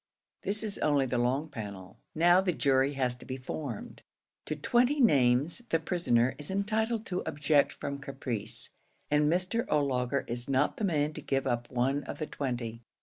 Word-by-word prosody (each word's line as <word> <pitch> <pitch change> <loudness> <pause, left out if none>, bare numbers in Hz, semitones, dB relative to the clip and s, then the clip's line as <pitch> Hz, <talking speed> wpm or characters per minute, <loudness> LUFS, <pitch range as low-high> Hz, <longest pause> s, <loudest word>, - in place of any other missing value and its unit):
This 210 +2 +1
is 210 -2 -2
only 145 -2 +2
the 125 -1 -1
long 130 +6 +1
panel. 100 -8 -8 0.2
Now 175 +3 +5
the 185 -2 0
jury 135 -1 +2
has 130 -3 0
to - - -13
be 130 - -5
formed. 130 -2 -6 0.4
To 155 - -2
twenty 245 - +2
names 140 - +4
the 165 - +3
prisoner 140 -8 +1
is 145 - -7
entitled 220 +3 0
to 180 -1 -2
object 145 -1 +2
from 140 0 -5
caprice, 135 -6 -2 0.4
and 150 +1 +3
Mr. 185 +7 0
O'Laugher 135 -2 +1
is 120 +2 -3
not 135 +2 +2
the 215 - 0
man 155 -4 +1
to - - -7
give 135 -1 -1
up 120 -2 -1
one 135 +3 0
of - - -6
the 155 - -3
twenty. 120 -6 -4
140 Hz, 175 wpm, -30 LUFS, 125-170 Hz, 0.4 s, Now